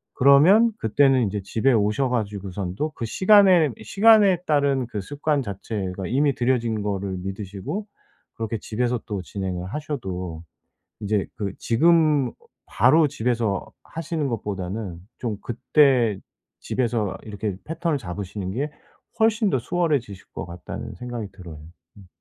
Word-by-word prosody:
그러면 170 - +6
그때는 130 +1 +3
이제 100 +1 -3
집에 115 +7 +1
오셔가지고선도 105 - -1
그 115 - -4
시간에, 185 - +5
시간에 205 - +5
따른 140 -4 +2
그 105 -4 -5
습관 145 +6 -1
자체가 95 -3 -4
이미 140 +2 +2
들여진 120 -3 0
거를 100 -2 -2
믿으시고 100 - -5 0.5
그렇게 115 0 -3
집에서 120 +3 -1
또 100 -5 -4
진행을 90 -1 -4
하셔도 95 - -5 0.6
이제 105 -1 0
그 100 -2 -3
지금 155 +1 +3 0.4
바로 160 -1 +4
집에서 115 -6 -1 0.2
하시는 160 -2 -3
것보다는 100 -5 -4 0.2
좀 110 -5 -3
그때 125 -3 +2 0.4
집에서 115 -5 -1
이렇게 105 -2 -4
패턴을 165 -1 -1
잡으시는 95 -1 -5
게 140 +8 -2 0.5
훨씬 220 -1 +3
더 130 - +1
수월해지실 135 - -1
것 - - -5
같다는 85 0 -8
생각이 120 -3 -5
들어요. 85 -4 -11 0.4
음. 95 -2 -15
115 Hz, 295 characters per minute, -24 LUFS, 100-145 Hz, 0.6 s, 그러면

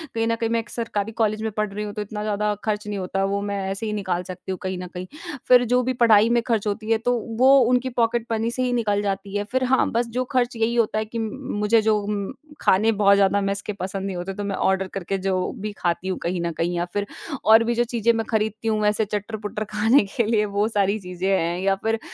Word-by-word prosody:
कहीं 225 0 +1
न 230 - +1
कहीं 230 0 -2
मैं 230 0 +1
एक 230 - -7
सरकारी 220 -2 -3
कॉलेज 215 0 +1
में 220 - -1
पढ़ 215 -1 0
रही 210 +1 -3
हूँ 205 - -6
तो 210 - -4
इतना 210 +1 -5
ज़्यादा 210 0 0
खर्च 210 -1 -2
नहीं 205 -1 -3
होता 190 +1 -2
वो 200 +1 0
मैं 200 0 -3
ऐसे 195 +3 -3
ही 215 - -2
निकाल 185 -4 -2
सकती 185 +1 -7
हूँ 185 - -3
कहीं 185 0 -2
न 180 0 -6
कहीं। 180 0 -6 0.4
फिर 250 -1 +7
जो 250 - +4
भी 255 +1 0
पढ़ाई 220 -1 +6
में 235 0 +3
खर्च 220 -3 0
होती 215 +1 -3
है 225 - +4
तो 245 - +3 0.3
वो 265 +2 +7
उनकी 250 +1 +2
पॉकेट 230 0 +1
मनी 225 +1 0
से 255 +1 -1
ही 250 -1 0
निकल 210 -4 +1
जाती 200 0 -3
है 205 - -1
फिर, 255 +5 -1
हाँ 255 +1 +2
बस 235 +1 0
जो 245 +2 -2
खर्च 250 -2 +1
यही 225 +1 0
होता 225 -2 +1
है 215 - -2
कि 230 +2 -5
मुझे 220 -2 0
जो 215 -1 +1 0.6
खाने 215 +4 +4
बहुत 200 -2 +4
ज़्यादा 200 0 +3
मेस 200 0 -1
के 210 - -5
पसंद 190 +1 -3
नहीं 195 -2 -3
होते 180 +2 -4
तो 205 +1 -5
मैं 200 -1 -2
ऑर्डर 190 0 +1
करके 195 0 -2
जो 185 -1 +1 0.2
भी 210 +1 -3
खाती 175 +2 -1
हूँ 190 - -1
कहीं 175 0 -1
न 170 0 -1
कहीं 175 +1 0
या 175 - 0
फिर 205 0 -1 0.4
और 220 +1 +7
भी 235 +1 0
जो 240 - +3
चीजें 235 0 +3
मैं 225 -1 -1
खरीदती 220 0 -1
हूँ। 215 -1 +1
वैसे 210 +1 +2
चट्टर-पुट्टर 210 +1 -4
खाने 220 +5 +4
के 235 - +4
लिए 215 -1 +2
वो 210 - +3
सारी 205 -2 +1
चीजें 180 -1 -4
हैं 170 +1 -1
या 195 0 +2
फिर 225 0 +1
210 Hz, 255 wpm, -23 LUFS, 195-230 Hz, 0.6 s, फिर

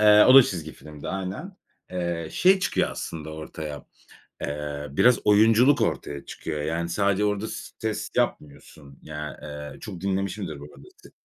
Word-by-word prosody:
Eee, 105 0 +8
o 130 - +8
da 135 - +11
çizgi 80 -7 -4
filmdi, 75 -1 -10
aynen. 95 - -5 0.3
Eee, 85 -3 -3
şey 190 +1 +4
çıkıyor - - 0
aslında 80 -1 -6
ortaya, 80 -1 -7 0.5
eee, 75 0 -4
biraz 120 - +4
oyunculuk 115 +6 +5
ortaya 70 -1 -2
çıkıyor. 75 -2 -5
Yani, 80 +2 -2
sadece 100 +3 +1
orada 105 +1 -1
s - - -7
ses 110 -1 -3
yapmıyorsun. 70 -1 -3
Yani, 75 0 -6
eee, 75 0 -8
çok 95 -5 -8
dinlemişimdir 95 -5 -2
bu - - -9
arada 70 - -15
sette. - - -17
85 Hz, 155 wpm, -25 LUFS, 75-105 Hz, 0.5 s, da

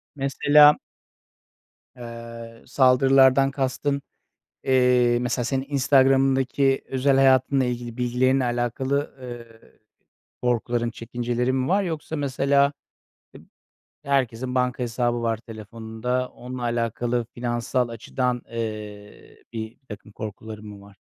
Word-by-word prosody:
Mesela 145 +2 +5 1.2
aaa, 115 -1 -10
saldırılardan 135 +1 +4
kastın, 140 +1 -1 0.6
eee, 125 -2 +3
mesela 125 0 -1
senin 135 +2 -2
Instagram'ındaki 135 -1 +3
özel 135 +1 +2
hayatınla 135 0 +4
ilgili 120 -1 -4
bilgilerinle 125 +2 +1
alakalı, 125 +4 -1
eee, 120 -2 -11 0.7
korkuların, 120 -1 0
çekincelerin 120 +2 -2
mi 130 0 -1
var? 195 +3 +2
Yoksa 160 -3 -4
mesela 140 0 +2 1.4
eb - - -12
herkesin 125 -2 0
banka 125 0 0
hesabı 120 0 -1
var 115 -1 0
telefonunda, 115 +3 -5
onunla 125 0 -8
alakalı 120 0 -1
finansal 120 +1 -1
açıdan, 125 +2 -2
eee, 105 -3 -7
birtakım 110 -1 -9
korkuların 110 0 -8
mı 100 -1 -10
var? 100 0 -17
125 Hz, 100 wpm, -24 LUFS, 115-135 Hz, 1.4 s, Mesela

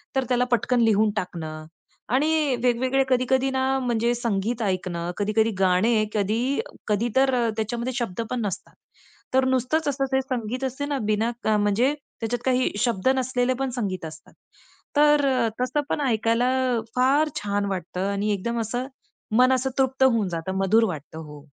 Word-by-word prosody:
तर 265 - +2
त्याला 250 0 +2
पटकन 240 +1 +2
लिहून 215 -1 +3
टाकणं 160 -5 -5 0.5
आणि 300 -2 +2
वेगवेगळे 255 +2 +2
कधी-कधी 260 +1 +2
ना 260 0 0 0.2
म्हणजे 240 -1 0
संगीत 230 0 -2
ऐकणं, 180 -4 -2
कधी-कधी 215 +2 +1
गाणे 200 +4 +3
कधी 210 +1 0 0.5
कधी 215 +3 +1
तर 265 0 +4
अ, 235 -2 +2
त्याच्यामध्ये 235 +3 -2
शब्द 230 -5 -2
पण 250 -2 -2
नसतात. 190 - -5 0.6
तर 260 0 +4
नुसतंच 260 +5 +1
असं 275 -1 0
ते 265 - +3
संगीत 255 -1 -4
असते 265 +2 -2
ना 285 -1 -2
बिना 215 +2 +1
क - - -3 0.2
म्हणजे 230 +8 +2 0.3
त्याच्यात 240 +1 -2
काही 255 0 +2
शब्द 235 -1 +1
नसलेले 255 -1 0
पण 270 - -1
संगीत 185 -7 -3
असतात. 155 0 -11 0.6
तर 295 -1 +5
अ, 240 -3 +1
तसं 255 +4 0
पण 295 - -1
ऐकायला 230 +1 +1 0.3
अ, - - -1
फार 275 +5 +3
छान 200 0 -1
वाटतं 185 +1 -3
आणि 205 +1 -1
एकदम 235 +4 -2
असं 245 +4 -3 0.5
मन 255 +1 +5
असं 260 +1 0
तृप्त 265 0 +2
होऊन 230 -7 +3
जातं 175 +3 -4
मधुर 220 +4 +4
वाटतं. 155 +2 -9
हो. 150 -1 -12
235 Hz, 165 wpm, -24 LUFS, 205-260 Hz, 0.6 s, तर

